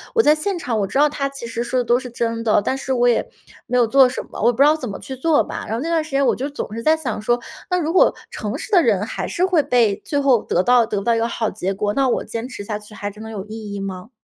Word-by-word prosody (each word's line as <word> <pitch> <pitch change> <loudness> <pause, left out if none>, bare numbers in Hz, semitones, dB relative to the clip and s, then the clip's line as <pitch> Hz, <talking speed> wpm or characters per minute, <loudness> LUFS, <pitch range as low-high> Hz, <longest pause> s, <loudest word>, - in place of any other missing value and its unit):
我 450 - +6
在 300 - +6
现 350 +5 -2
场 245 -9 -2
我 195 - 0
知 270 - -3
道 295 +1 +5
他 275 -1 -2
其 275 -4 -8
实 230 0 -3
说 255 +1 -2
的 - - +1
都 240 +1 +2
是 255 - -8
真 230 -1 -2
的， 215 -2 +3
但 265 - -1
是 270 0 -2
我 245 -1 +3
也 235 - +1 0.4
没 250 - 0
有 240 - +5
做 265 +3 +6
什 250 - -4
么， - - -9
我 - - +3
也 - - +6
不 - - -9
知 275 - +6
道 300 +2 +5
怎 260 -6 -5
么 195 - -5
去 265 - -7
做 315 +2 +3
吧。 - - -6
然 220 - -2
后 235 - -3
那 330 - -3
段 325 -2 +1
时 310 - -12
间 275 0 +2
我 - - +3
就 275 +3 -3
总 280 -6 -6
是 230 - -4
在 315 +5 +4
想 245 -9 -4
说， 240 +3 +1 0.3
那 360 - +1
如 320 -1 -1
果 370 - +5 0.2
诚 - - -4
实 - - -8
的 365 -4 +6
人 210 - +2
还 - - -4
是 360 - 0
会 365 -4 +3
被 230 -6 +3
最 285 - 0
后 260 -5 +3
得 180 - +1
到 245 0 +4
得 210 -2 -3
不 - - -6
到 235 +1 +2
一 - - 0
个 230 - +1
好 225 -2 -2
结 190 +2 -3
果， 205 +1 -1
那 270 +2 +2
我 - - 0
坚 230 +2 -5
持 225 -5 -8
下 210 0 -4
去 210 0 -15
还 205 0 -5
真 210 +2 -11
的 220 - -8
有 200 -3 -6
意 215 -1 -7
义 200 - -4
吗？ 190 +3 -6
240 Hz, 355 characters per minute, -20 LUFS, 220-280 Hz, 0.4 s, 我